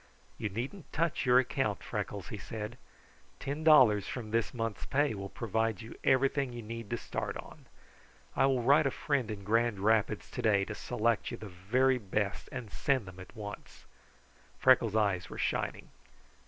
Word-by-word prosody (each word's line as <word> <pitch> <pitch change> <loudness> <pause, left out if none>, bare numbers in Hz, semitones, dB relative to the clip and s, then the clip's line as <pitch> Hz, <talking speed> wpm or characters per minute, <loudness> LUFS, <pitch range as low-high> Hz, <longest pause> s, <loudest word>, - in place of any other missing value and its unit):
"You 105 - -1
needn't 130 - -6
touch 165 -4 0
your 125 0 +7
account, 120 - +1
Freckles," - - -4
he - - -6
said. 110 +2 -6 0.6
"Ten 145 +3 -4
dollars 125 -11 +6
from 115 -4 -5
this 115 0 +1
month's 115 -4 -4
pay 145 0 +2
will 100 -1 -6
provide 110 -2 -1
you 110 - -9
everything 135 0 +2
you 120 -1 -6
need 115 -1 -7
to 120 - -1
start - - -4
on. - - -12 0.7
I - - +4
will 130 -3 +1
write 140 +4 +5
a - - +3
friend 135 -4 -1
in 105 -2 -5
Grand 115 +1 +2
Rapids 110 0 +1
today 105 -5 +2
to 105 - -5
select 115 +2 0
you - - -5
the 110 - -8
very 125 +9 +2
best 100 -1 -2
and 125 -6 -6
send 135 -6 +1
them 95 -1 -11
at 95 - -12
once." 105 -2 -9 0.7
Freckles' 115 -4 +5
eyes 100 -5 +1
were - - -8
shining. - - -2
115 Hz, 170 wpm, -31 LUFS, 105-130 Hz, 0.7 s, your